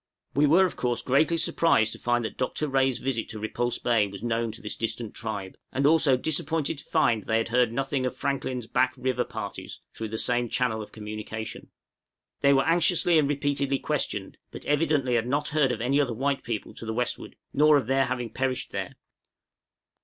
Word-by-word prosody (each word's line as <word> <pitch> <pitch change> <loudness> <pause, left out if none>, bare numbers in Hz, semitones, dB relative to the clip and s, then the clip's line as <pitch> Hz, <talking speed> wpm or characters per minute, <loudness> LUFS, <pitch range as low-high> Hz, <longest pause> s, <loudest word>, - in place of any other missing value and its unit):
We 145 +3 +4
were 175 +6 +6
of 180 - -3
course 120 -1 -1
greatly 155 +6 +3
surprised 165 -8 +3
to - - -9
find 120 -1 +1
that - - -5
Dr. 140 +4 -1
Rae's 135 -2 +2
visit 125 -3 -2
to 110 - -5
Repulse 120 +3 -2
Bay 115 -4 +2
was 100 +1 -9
known 115 -1 -1
to 115 - -6
this 105 - -4
distant 115 0 -3
tribe; 105 -4 -5
and 135 +1 0
also 145 -3 +5
disappointed 155 +1 0
to - - -11
find 110 -3 +2
they 110 - +1
had 115 0 -1
heard 120 -1 +3
nothing 135 +2 -1
of - - -5
Franklin's 130 -3 -2
Back 130 +3 +1
River 125 -1 0
parties - - -7
through 110 - -4
the 110 +1 -4
same 120 +1 0
channel 115 -3 0
of 105 - -9
communication. 110 +1 -7 0.7
They 140 - +4
were 135 0 +4
anxiously 170 0 +4
and 145 -2 +1
repeatedly 140 -1 0
questioned, - - -3
but - - -10
evidently 150 -4 +1
had 120 0 +1
not 145 +3 0
heard 150 -4 +2
of - - -3
any 135 +4 +2
other 125 -5 -1
white 135 +3 0
people 115 -2 -4
to - - -8
the 110 - -3
westward, 125 +1 -3 0.2
nor 150 +1 +5
of 135 - -1
their 135 +2 +2
having 125 -3 -3
perished 130 +1 -2
there. - - -4
130 Hz, 200 wpm, -26 LUFS, 115-140 Hz, 0.7 s, were